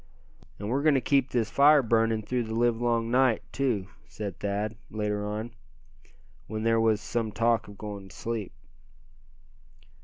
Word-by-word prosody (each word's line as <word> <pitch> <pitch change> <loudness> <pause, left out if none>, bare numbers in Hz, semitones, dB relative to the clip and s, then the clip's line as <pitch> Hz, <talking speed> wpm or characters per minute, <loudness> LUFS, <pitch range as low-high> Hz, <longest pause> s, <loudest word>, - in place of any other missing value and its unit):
"And 100 - -6
we're 130 +5 0
going 155 -1 +4
to - - +4
keep 135 0 +2
this 115 -3 -1
fire 145 0 +6
burning 115 -1 +2
through 120 +2 -1
the 110 0 -4
live 120 0 +2
long 115 -1 +1
night, 125 -3 +3
too," 120 -9 -1 0.2
said 100 -3 -6
Thad, 105 +2 -2
later 105 -1 -2
on, 105 +3 -4 1.0
when 110 0 -4
there 115 0 +3
was 110 -2 +3
some 115 -1 -2
talk 115 +1 +1
of 100 -1 -12
going 100 -2 -7
to - - -14
sleep. 115 -4 -4
115 Hz, 160 wpm, -28 LUFS, 105-120 Hz, 1.0 s, fire